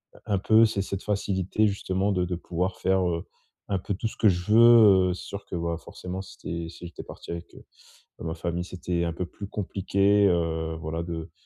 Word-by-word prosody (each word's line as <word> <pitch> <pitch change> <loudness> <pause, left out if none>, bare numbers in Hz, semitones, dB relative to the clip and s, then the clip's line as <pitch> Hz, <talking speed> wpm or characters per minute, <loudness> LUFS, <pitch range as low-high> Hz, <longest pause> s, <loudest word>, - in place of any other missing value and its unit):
heu, - - -15
un 100 -2 +1
peu 110 +4 +5
c'est 100 -3 -1
cette 100 0 -4
facilité 100 0 0
justement 100 0 -1
de 90 -2 +1
de 90 0 -2
pouvoir 90 +2 -3
faire, 95 -1 +2
heu, 85 -1 -2 0.5
un 95 -2 0
peu 100 - -3
tout 110 +4 -2
ce - - -13
que 110 - +4
je 90 +2 +1
veux. 110 -5 +7
Heu, - - 0
c'est 90 - -8
sûr 100 0 -7
que - - -6
bah, 85 -1 -2
forcément, 90 +2 -7
si 95 - -12
tu 85 0 -4
es - - -7
si 90 - -11
j'étais - - -9
parti - - -10
avec, 85 0 -7
heu, - - -13 0.6
bah, - - -8
ma 80 - -2
famille, 85 +1 -3
c'était 90 -1 -2
un 85 - -1
peu 90 +2 -4
plus 100 +3 -8
compliqué, 100 0 +2
heu, 80 -2 0
voilà 80 +1 -4
de 85 -1 -5
90 Hz, 230 wpm, -26 LUFS, 85-100 Hz, 0.6 s, veux